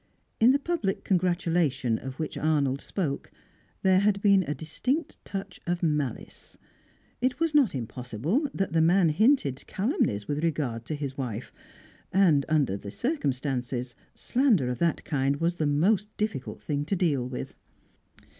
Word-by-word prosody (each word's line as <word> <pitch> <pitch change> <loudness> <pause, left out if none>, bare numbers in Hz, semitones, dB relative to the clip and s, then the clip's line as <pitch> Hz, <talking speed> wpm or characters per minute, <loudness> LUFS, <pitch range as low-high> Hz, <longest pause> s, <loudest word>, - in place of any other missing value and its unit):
In 230 +3 +7
the 275 - +4
public 285 - -2
congratulation 170 - +1
of 130 0 -7
which 155 - -4
Arnold 140 -3 +1
spoke, 150 -8 -3 0.5
there 190 -1 +5
had 200 0 +2
been 200 -1 +5
a 150 - -1
distinct 255 - -3
touch 195 -1 -6
of 175 0 -1
malice. 150 -6 -2 0.6
It 255 +3 0
was 330 -2 +1
not 275 - +4
impossible 130 - -2
that 195 -3 -2
the 165 - +4
man 175 +1 +4
hinted 160 - +2
calumnies 190 - 0
with 150 +2 -2
regard 135 -8 -1
to 155 - -3
his 140 -2 -5
wife, 120 -3 -4 0.6
and, 165 -8 +4
under 145 -11 +2
the 100 - -8
circumstances, 130 - -2 0.2
slander 235 - +2
of 125 - -3
that 170 -1 0
kind 140 -2 +1
was 170 +4 -1
the 155 - +1
most 185 +8 +2
difficult 215 -11 -3
thing 145 -1 -2
to 195 - 0
deal 145 -9 0
with. 125 - -6
160 Hz, 150 wpm, -27 LUFS, 135-195 Hz, 0.6 s, In